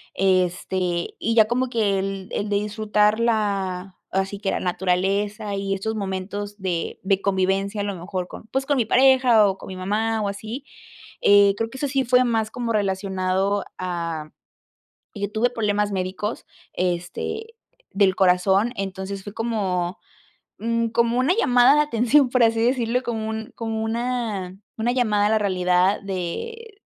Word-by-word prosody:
este, 185 Hz, -1 st, 0 dB
y 230 Hz, +1 st, 0 dB
ya 220 Hz, -2 st, +7 dB
como 250 Hz, +2 st, 0 dB
que 210 Hz, -5 st, +1 dB
el 195 Hz, -1 st, -4 dB
el 205 Hz, -, -2 dB
de 205 Hz, -, +1 dB
disfrutar 210 Hz, +1 st, +1 dB
la 195 Hz, -5 st, -1 dB, 0.2 s
así 195 Hz, +1 st, -1 dB
que 195 Hz, -, -1 dB
la -, -, -1 dB
naturaleza 195 Hz, +4 st, -1 dB
y 195 Hz, 0 st, -2 dB
estos 220 Hz, +3 st, -3 dB
momentos 200 Hz, +1 st, -4 dB
de 185 Hz, -4 st, -3 dB
de 195 Hz, 0 st, +1 dB
convivencia, 195 Hz, +1 st, 0 dB
a -, -, 0 dB
lo 200 Hz, -1 st, -3 dB
mejor 180 Hz, +1 st, -4 dB
con -, -, -10 dB
pues 265 Hz, +4 st, -2 dB
con 285 Hz, 0 st, +1 dB
mi 250 Hz, -, +2 dB
pareja 255 Hz, -3 st, +5 dB
o 195 Hz, -1 st, -1 dB
con -, -, -11 dB
mi 190 Hz, -, -7 dB
mamá 215 Hz, +4 st, -1 dB
o 205 Hz, -, -1 dB
así, 220 Hz, +7 st, -6 dB, 0.6 s
eh, 200 Hz, 0 st, +6 dB
creo 225 Hz, +1 st, -2 dB
que 265 Hz, -, -10 dB
eso 285 Hz, -, -1 dB
sí 270 Hz, 0 st, +1 dB
fue 250 Hz, 0 st, +4 dB
más 225 Hz, -2 st, 0 dB
como 235 Hz, -2 st, -2 dB
relacionado 195 Hz, -1 st, 0 dB
a 170 Hz, -4 st, -4 dB, 0.9 s
Yo 205 Hz, -1 st, -3 dB
tuve 230 Hz, +3 st, +1 dB
problemas 210 Hz, -3 st, 0 dB
médicos, 190 Hz, +3 st, -3 dB, 0.3 s
este, 180 Hz, -, -3 dB, 0.4 s
del 195 Hz, -1 st, +3 dB
corazón, 190 Hz, +4 st, +3 dB
entonces 195 Hz, 0 st, -5 dB
fue 205 Hz, -, -8 dB
como, 195 Hz, -5 st, -1 dB, 0.6 s
mm, 230 Hz, +1 st, 0 dB
como 235 Hz, +1 st, +1 dB
una 270 Hz, +8 st, +3 dB
llamada 250 Hz, -, +5 dB
de 300 Hz, -, +4 dB
atención, 265 Hz, 0 st, +3 dB
por 255 Hz, -1 st, +3 dB
así 225 Hz, 0 st, +2 dB
decirlo, 245 Hz, 0 st, +1 dB
como 225 Hz, -3 st, -3 dB
un 220 Hz, 0 st, -5 dB
como 225 Hz, -1 st, -3 dB
una 225 Hz, -5 st, -2 dB, 0.2 s
una 235 Hz, +2 st, +1 dB
llamada 215 Hz, -5 st, +2 dB
a -, -, +2 dB
la 220 Hz, -, +3 dB
realidad 185 Hz, -1 st, +2 dB
de 405 Hz, -, -5 dB
205 Hz, 165 wpm, -23 LUFS, 190-230 Hz, 0.9 s, ya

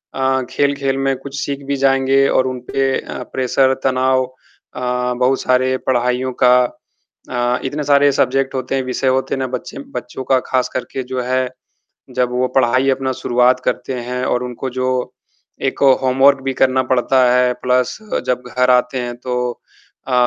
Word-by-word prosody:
अ, 130 Hz, 0 st, +1 dB
खेल-खेल 140 Hz, 0 st, 0 dB
में 135 Hz, 0 st, 0 dB
कुछ 140 Hz, +1 st, -7 dB
सीख 140 Hz, -1 st, -4 dB
भी 140 Hz, -, 0 dB
जाएँगे 135 Hz, 0 st, +3 dB
और 130 Hz, 0 st, +2 dB
उन 130 Hz, -1 st, -4 dB
पे 135 Hz, -1 st, +1 dB
अ, -, -, -7 dB
प्रेशर, 130 Hz, +1 st, +2 dB
तनाव 130 Hz, 0 st, +2 dB, 0.5 s
अ, 125 Hz, 0 st, -1 dB
बहुत 130 Hz, +1 st, +2 dB
सारे 130 Hz, +1 st, +2 dB
पढ़ाइयों 125 Hz, +1 st, +1 dB
का 125 Hz, 0 st, +7 dB, 0.7 s
अ, 125 Hz, 0 st, 0 dB
इतने 145 Hz, +3 st, -3 dB
सारे 145 Hz, 0 st, +4 dB
सब्जेक्ट 135 Hz, +1 st, +1 dB
होते 130 Hz, +1 st, -2 dB
हैं, 135 Hz, -, 0 dB
विषय 130 Hz, +1 st, -2 dB
होते 130 Hz, +1 st, +1 dB
हैं -, -, -5 dB
ना 130 Hz, -, -1 dB
बच्चे 135 Hz, -, -10 dB, 0.2 s
बच्चों 125 Hz, +2 st, -6 dB
का 130 Hz, -, +5 dB
ख़ास 130 Hz, -1 st, +1 dB
करके 130 Hz, +1 st, -4 dB
जो 130 Hz, 0 st, -3 dB
है, 130 Hz, 0 st, 0 dB, 0.6 s
जब 125 Hz, -1 st, -1 dB
वो 125 Hz, +1 st, +1 dB
पढ़ाई 130 Hz, +1 st, +3 dB
अपना 130 Hz, 0 st, 0 dB
शुरुआत 125 Hz, +1 st, +2 dB
करते 125 Hz, +1 st, -2 dB
हैं 125 Hz, +1 st, -4 dB
और 125 Hz, 0 st, 0 dB
उनको 125 Hz, +1 st, -5 dB
जो 130 Hz, +1 st, -2 dB, 0.8 s
एक -, -, -3 dB
ओ, 135 Hz, -1 st, +7 dB
होमवर्क 135 Hz, +1 st, +4 dB
भी 135 Hz, -, -1 dB
करना 130 Hz, 0 st, +2 dB
पड़ता 130 Hz, +1 st, +2 dB
है 125 Hz, 0 st, +3 dB
प्लस 125 Hz, 0 st, +1 dB, 0.3 s
जब 125 Hz, 0 st, 0 dB
घर 125 Hz, 0 st, +3 dB
आते 125 Hz, +1 st, +2 dB
हैं 120 Hz, -1 st, -4 dB
तो 125 Hz, 0 st, -4 dB, 0.7 s
अ, 130 Hz, -, -2 dB
130 Hz, 175 wpm, -18 LUFS, 125-135 Hz, 0.8 s, का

